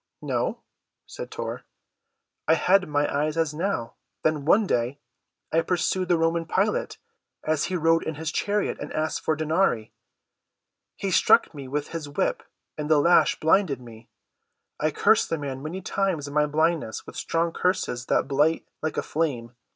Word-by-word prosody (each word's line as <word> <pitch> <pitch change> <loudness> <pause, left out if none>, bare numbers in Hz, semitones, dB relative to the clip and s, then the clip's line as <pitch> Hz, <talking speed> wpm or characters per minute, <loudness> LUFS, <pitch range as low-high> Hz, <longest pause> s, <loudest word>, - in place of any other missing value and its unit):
"No," - - -1 0.5
said - - -8
Tor. - - -5 0.9
"I 160 - +5
had 185 +3 +3
my 145 0 +2
eyes 150 +2 0
as 160 -2 +1
now. 155 -8 -2 0.3
Then 155 -3 +1
one 205 +7 +5
day 125 -4 0 0.6
I 165 - +4
pursued 180 +1 0
the 175 -1 +3
Roman 165 0 0
Pilate, - - 0 0.5
as 155 -1 +1
he 185 - -2
rode 165 -1 +3
in 160 - -4
his 160 +1 -3
chariot, 205 0 -1
and - - -6
asked 155 0 -1
for 155 - 0
denarii. 155 - 0 1.0
He 195 - -3
struck - - +4
me 140 -3 -8
with 145 +2 -3
his 160 -3 -5
whip, 145 - -1 0.4
and 150 0 -3
the 155 - +5
lash 170 +5 +4
blinded 160 -4 +3
me. 115 -2 -13 0.7
I - - +2
cursed - - +3
the 165 - 0
man 135 -3 -5
many 165 +6 -5
times 185 -6 -1
in 140 - -8
my 150 0 +3
blindness 155 -5 0
with - - -11
strong 165 0 0
curses 125 -9 -1
that - - +2
blight 150 +4 +1
like 155 - -3
a - - 0
flame. 130 -7 -2
155 Hz, 165 wpm, -25 LUFS, 145-170 Hz, 1.0 s, I